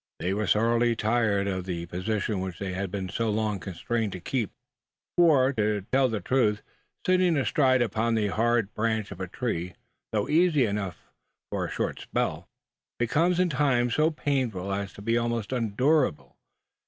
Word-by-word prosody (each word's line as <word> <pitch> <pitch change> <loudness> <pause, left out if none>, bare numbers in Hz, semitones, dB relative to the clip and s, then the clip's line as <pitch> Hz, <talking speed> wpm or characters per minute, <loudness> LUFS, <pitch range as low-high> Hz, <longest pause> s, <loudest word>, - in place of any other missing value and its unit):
They 90 +2 -1
were 105 0 -1
sorely 115 +3 +3
tired 110 -3 +1
of 95 -2 -2
the 85 -2 -4
positions 95 +3 -2
which 95 -2 -5
they 95 -2 -4
had 95 +1 -3
been 95 0 -4
so 115 +5 -1
long 105 -1 0
constrained 100 +4 -3
to 90 - -6
keep; 115 +3 -2 0.7
for, 145 -6 +5
to 105 -3 0
tell 130 0 +4
the 110 -2 -2
truth, 105 0 +1 0.4
sitting 185 -3 +3
astride 130 -2 +3
upon 115 +1 0
the 105 -2 +1
hard 115 0 +1
branch 110 -1 -1
of - - -8
a 95 - -3
tree, 90 -4 -3 0.4
though 105 -2 0
easy 155 -4 +4
enough 100 -4 -4 0.4
for - - -1
a - - -8
short - - -2
spell, 80 +2 -2 0.5
becomes 165 +9 +2
in 180 -1 +3
time 130 -4 +2
so 155 +5 +3
painful 125 - -1
as 100 -1 -3
to 100 - -11
be 115 +2 +2
almost 120 -2 -2
unendurable. 125 - +1
110 Hz, 165 wpm, -27 LUFS, 100-130 Hz, 0.7 s, for